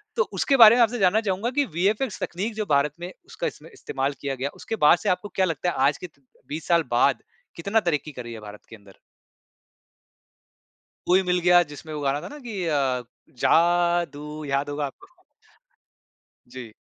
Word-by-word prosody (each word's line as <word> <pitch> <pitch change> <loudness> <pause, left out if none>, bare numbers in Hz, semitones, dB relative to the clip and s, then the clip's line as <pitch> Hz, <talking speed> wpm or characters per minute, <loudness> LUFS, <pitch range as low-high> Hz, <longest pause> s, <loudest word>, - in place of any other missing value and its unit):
तो 475 - +3
उसके 275 -2 +1
बारे 225 -1 +9
में 245 - +3
आपसे 230 +1 -1
जानना 195 +4 +3
चाहूँगा 200 +3 -1
कि 285 - +3
वीएफएक्स 210 +6 0
तकनीक 200 +6 -3
जो 215 -1 -2
भारत 140 0 +2
में 175 +1 -6
उसका - - -4
इसमें - - -9
इस्तेमाल 140 - -3
किया 140 -1 -3
गया 135 +2 -3
उसके 225 - -5
बाद 175 - +7
से - - -2
आपको 190 +3 -1
क्या 190 - +3
लगता 165 +1 -2
है - - -4
आज 145 - 0
के 180 - -8
त 140 -3 -33 0.3
20 155 +2 -6
साल 170 -2 +3
बाद 125 +3 +2 0.3
कितना 200 +6 +1
तरक्की 155 -5 -2
कर 125 -3 -8
रही 120 0 -8
है 110 - -8
भारत 105 -1 -12
के - - -10
अंदर? 100 -2 -18 2.1
कोई 185 +2 +4
मिल 180 0 +1
गया 175 0 +5
जिसमें 150 +1 -10
वो 150 - -4
गाना 140 +1 0
था - - -8
न - - -10
कि 205 -6 -5
अ, 135 -5 0 0.4
जादू 170 -3 +1
याद 140 +1 -1
होगा 145 0 -2
आपको? 135 - -11 1.4
जी। 120 -4 -10
170 Hz, 190 wpm, -24 LUFS, 140-195 Hz, 2.1 s, बारे